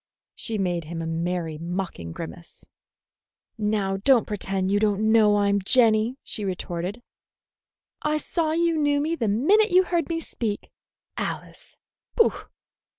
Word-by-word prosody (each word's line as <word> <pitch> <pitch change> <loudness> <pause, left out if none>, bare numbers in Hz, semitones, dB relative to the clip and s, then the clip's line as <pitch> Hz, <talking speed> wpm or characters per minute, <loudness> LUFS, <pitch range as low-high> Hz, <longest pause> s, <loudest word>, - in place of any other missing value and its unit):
She 225 -2 -3
made 175 -4 -1
him 165 +1 -6
a - - -4
merry, 165 -1 -2
mocking 170 - -4
grimace. 170 - -9 0.9
"Now 210 -3 0
don't 240 +3 +4
pretend 195 -2 -2
you 205 - +3
don't 215 +1 +2
know 215 -2 +5
I'm 200 0 +2
Jenny," 225 +2 +3
she 210 - -5
retorted. 185 +3 -4 1.0
"I 300 0 +1
saw 315 +1 -1
you 335 0 +2
knew 290 -1 +2
me 310 +3 0
the 230 -9 -1
minute 375 - +3
you 365 0 +5
heard 345 -4 -1
me 330 -1 -1
speak. 225 -9 -4 0.5
Alice! - - -6 0.4
Pooh! 460 - +4
210 Hz, 140 wpm, -25 LUFS, 185-285 Hz, 1.0 s, know